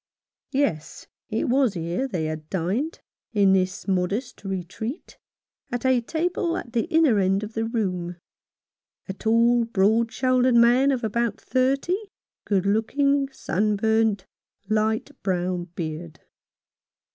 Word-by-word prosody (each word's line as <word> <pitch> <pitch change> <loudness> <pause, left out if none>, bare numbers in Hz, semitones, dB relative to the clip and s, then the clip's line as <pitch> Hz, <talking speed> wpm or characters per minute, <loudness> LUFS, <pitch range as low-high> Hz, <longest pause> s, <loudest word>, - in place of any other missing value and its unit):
Yes, 260 - -1 0.2
it 220 - -1
was 250 -4 +2
here 170 +10 -2
they 175 -10 -2
had 155 0 -5
dined, 195 - -2 0.3
in 200 -3 +4
this 185 +1 0
modest 195 +6 -1
retreat, 195 - -5 0.5
at 245 +1 -3
a 260 -2 +4
table 335 +5 -1
at 240 - -7
the 230 -2 +1
inner 315 -10 +3
end 195 +1 +1
of 215 +1 -7
the 225 0 -1
room; 185 -7 -2 0.9
a 190 - -3
tall, 230 +4 +3
broad 225 +1 +2
shouldered 255 -1 +2
man 240 +4 +5
of 260 -2 -1
about 225 0 -1
thirty, 275 +8 +1 0.5
good 195 -2 +1
looking, 275 +7 +1
sunburnt, 215 -2 +1 0.4
light 215 +1 0
brown 180 -2 -1
beard. 160 0 -5
220 Hz, 120 wpm, -24 LUFS, 190-255 Hz, 0.9 s, man